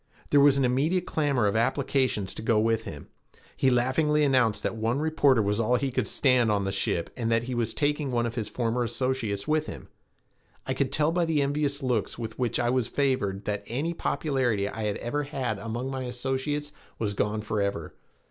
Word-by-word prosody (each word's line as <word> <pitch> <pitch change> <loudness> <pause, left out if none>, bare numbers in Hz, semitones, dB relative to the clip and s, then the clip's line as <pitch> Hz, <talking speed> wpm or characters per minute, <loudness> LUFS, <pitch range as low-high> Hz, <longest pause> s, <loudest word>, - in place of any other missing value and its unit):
There 145 - +6
was 140 -1 +6
an 135 - +3
immediate 155 +9 +1
clamor 140 -7 +1
of 100 - +1
applications 125 -4 0
to - - -7
go 110 -1 +2
with 115 0 +1
him. - - -8 0.5
He 135 - +3
laughingly 140 +5 +2
announced 125 -6 +2
that - - -1
one 115 +4 0
reporter 145 -6 +3
was 105 +2 0
all 115 +2 +1
that 125 - +2
he 135 - 0
could 125 -4 -1
stand 125 -2 +3
on 100 -1 +1
the 95 - -1
ship 95 -3 -1
and 115 -2 -2
that 115 0 +2
he 125 +1 -4
was 115 -2 0
taking 145 -1 0
one 120 -2 0
of 115 - -3
his 115 -4 -3
former 120 0 -1
associates 120 -5 -2
with 155 0 +1
him. - - -8 0.8
I - - -1
could - - -1
tell 150 +1 +2
by 175 0 +1
the 155 -3 +1
envious 140 0 -1
looks 125 -5 -1
with 115 -1 -6
which 125 -2 0
I 120 0 +1
was 125 -2 +1
favored 120 -9 -1
that 100 -1 -2
any 145 +9 -2
popularity 130 -11 0
I 110 +1 -4
had 105 -1 -1
ever 145 +5 -2
had 130 -7 -3
among 120 +5 -4
my 130 -1 -3
associates 135 +4 -3 0.3
was 105 -2 -2
gone 105 +1 -1
forever. 100 -6 -2
125 Hz, 205 wpm, -27 LUFS, 110-140 Hz, 0.8 s, There